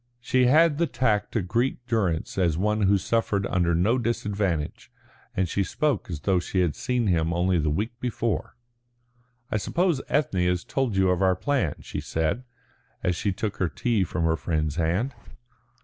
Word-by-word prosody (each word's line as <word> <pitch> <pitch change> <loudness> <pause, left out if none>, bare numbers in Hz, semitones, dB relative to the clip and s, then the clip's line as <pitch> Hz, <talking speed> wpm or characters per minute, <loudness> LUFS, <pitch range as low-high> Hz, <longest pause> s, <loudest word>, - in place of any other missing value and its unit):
She 125 +1 +2
had 155 +2 +4
the 170 - +2
tact 120 -4 0
to 110 - 0
greet 120 +6 -1
Durrance 100 -10 -1
as 85 -4 +2
one 105 +3 +1
who 100 0 +4
suffered 100 -1 0
under 85 -3 +1
no 110 +9 +2
disadvantage, 100 -8 -2 0.5
and 95 0 +2
she 100 +3 0
spoke 145 0 -1
as 80 -5 -5
though 95 +4 +2
she 90 +1 -1
had 85 -5 +1
seen 125 -2 -1
him 85 -4 +1
only 90 +1 +2
the 75 -1 +1
week 110 +10 -2
before. 120 -4 -2 1.0
"I - - +1
suppose 170 - 0
Ethne 100 -11 +1
has 90 0 0
told 130 -6 -1
you 95 -1 +4
of 90 0 0
our 95 -1 +4
plan," 100 - 0
she - - -5
said, 80 +10 -1 0.6
as 90 - +1
she 100 - -1
took 100 +2 -3
her 95 - 0
tea 115 0 0
from 90 -1 -2
her 80 0 +2
friend's 80 -2 -1
hand. 90 +11 0
100 Hz, 180 wpm, -26 LUFS, 90-120 Hz, 1.0 s, had